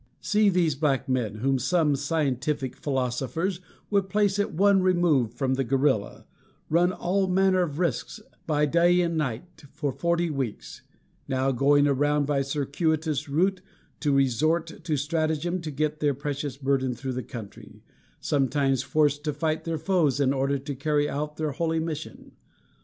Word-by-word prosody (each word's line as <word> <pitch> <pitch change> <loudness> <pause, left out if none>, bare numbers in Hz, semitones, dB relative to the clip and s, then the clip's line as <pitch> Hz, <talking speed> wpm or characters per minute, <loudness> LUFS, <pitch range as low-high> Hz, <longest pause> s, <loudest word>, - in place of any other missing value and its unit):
See 210 -1 +3
these 175 -5 +2
black 135 -1 0
men, 125 -5 -1
whom 135 +4 0
some 150 +2 +2
scientific 140 -2 -1
philosophers 135 - -2 0.3
would 200 -2 +1
place 205 0 +1
at 205 - 0
one 195 +3 +4
remove 175 - +2
from 135 -2 0
the 135 +1 0
gorilla, 130 -3 0 0.5
run 175 +3 +4
all 190 +2 0
manner 185 0 +3
of 150 -5 -2
risks, 170 -8 -2 0.3
by 150 -1 +2
day 170 +4 +3
and 170 -1 0
night, 150 +3 -4
for 145 -4 -2
forty 170 +3 0
weeks; 120 - -5 0.5
now 130 +1 +1
going 145 +3 +3
around 145 +1 +2
by 140 -1 +1
circuitous 150 +2 -1
route 185 +6 +1 0.4
to 150 - 0
resort 155 +6 +1
to 160 - -1
strategem 160 +4 -1
to 160 - -5
get 150 +1 -2
their 145 -3 +1
precious 140 -1 -4
burden 135 -2 0
through 130 +1 -4
the 130 - -3
country; 115 -6 -10 0.4
sometimes 135 -1 +1
forced 145 0 +1
to 150 - 0
fight 155 +2 -2
their 165 -1 -2
foes 155 -5 +1
in 135 -1 +2
order 140 +1 0
to 140 +2 -6
carry 145 +2 0
out 150 +1 -4
their 155 -1 -1
holy 165 +3 -1
mission. 160 -2 -6
150 Hz, 160 wpm, -26 LUFS, 135-170 Hz, 0.5 s, one